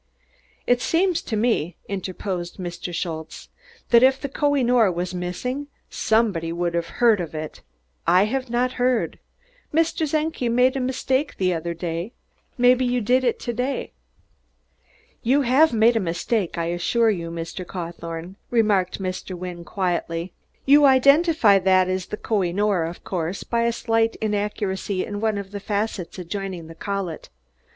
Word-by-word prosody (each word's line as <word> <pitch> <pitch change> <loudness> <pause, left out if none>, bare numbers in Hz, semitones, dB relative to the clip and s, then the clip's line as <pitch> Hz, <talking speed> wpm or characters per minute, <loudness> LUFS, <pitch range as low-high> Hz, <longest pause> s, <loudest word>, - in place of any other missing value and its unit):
"Id 245 0 +2
seems 340 +2 +1
to 220 - -4
me," 210 -7 +1
interposed 185 -2 -4
Mr. 175 -1 -5
Schultze, 160 -2 -5 0.4
"dat 235 -1 +7
if 265 +1 +5
der 280 - -4
Koh 285 +1 +1
i 270 - +2
noor 235 -5 +4
vas 175 +1 -3
missing 250 +11 -3 0.2
somebody 210 -8 +1
would 170 0 -1
haf 170 -1 -1
heard, 225 -5 +3
ain'd 165 -2 -6
id? 155 0 -6 0.5
I 180 +2 +6
haf 255 +4 -2
nod 245 +2 +1
heard. 250 -2 0 0.5
Mr. 320 -1 +1
Czenki 305 -5 -1
made 250 +3 +3
a - - 0
misdake 260 +2 -1
der 185 -2 +1
oder 170 +1 -4
day 170 +5 -4 0.4
maybe 250 +1 +5
you 250 0 +1
make 250 +4 +2
id 240 - +1
to 240 - -3
day?" 250 +4 -2 1.3
"You 265 +4 +3
have 270 +6 +4
made 230 +1 +4
a - - +3
mistake, 180 +2 -1
I 170 - -1
assure 225 +6 +2
you, 170 -4 -4
Mr. 165 +2 -5
Cawthorne," 170 0 -7
remarked 205 -6 +2
Mr. 185 -1 -4
Wynne 175 -1 -6
quietly. 175 -2 -2 0.3
"You 290 +1 +7
identify 275 - +5
that 185 -1 +4
as 185 -1 -2
the 210 - -5
Koh 215 -2 0
i 175 -2 0
noor, 200 -2 +1
of 170 +2 -7
course, 175 0 -3
by 235 0 0
a 235 - +2
slight 225 -1 +1
inaccuracy 205 -2 -2
in 205 0 -5
one 220 -2 +1
of 200 -1 -6
the 205 - -5
facets 205 -3 -3
adjoining 185 -1 -5
the 165 - -10
collet. 195 -1 -4
205 Hz, 160 wpm, -23 LUFS, 175-245 Hz, 1.3 s, dat